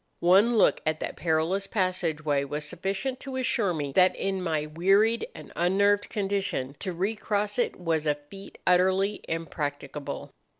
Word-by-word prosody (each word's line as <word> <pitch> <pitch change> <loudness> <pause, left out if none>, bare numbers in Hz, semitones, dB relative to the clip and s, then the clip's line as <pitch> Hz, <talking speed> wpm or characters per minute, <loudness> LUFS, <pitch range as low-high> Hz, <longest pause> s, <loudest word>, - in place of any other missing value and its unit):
One 200 +7 +5
look - - +4
at 155 0 -1
that - - -4
perilous 170 +4 0
passage 180 -7 -1
way 145 -2 +2
was 145 +2 -3
sufficient 195 +9 -3
to 270 -1 -7
assure 235 -6 +1
me 145 -4 -3
that 185 +5 +4
in 190 -1 -2
my 160 -4 -1
wearied 195 - +2
and - - -11
unnerved 200 +4 +2
condition 195 - -2
to 190 - -3
recross 205 +3 -1
it 240 - 0
was 165 -3 0
a 150 - +3
feat 170 +7 -13
utterly 190 +3 +3
impracticable. 150 -3 -4
185 Hz, 155 wpm, -27 LUFS, 155-200 Hz, -, One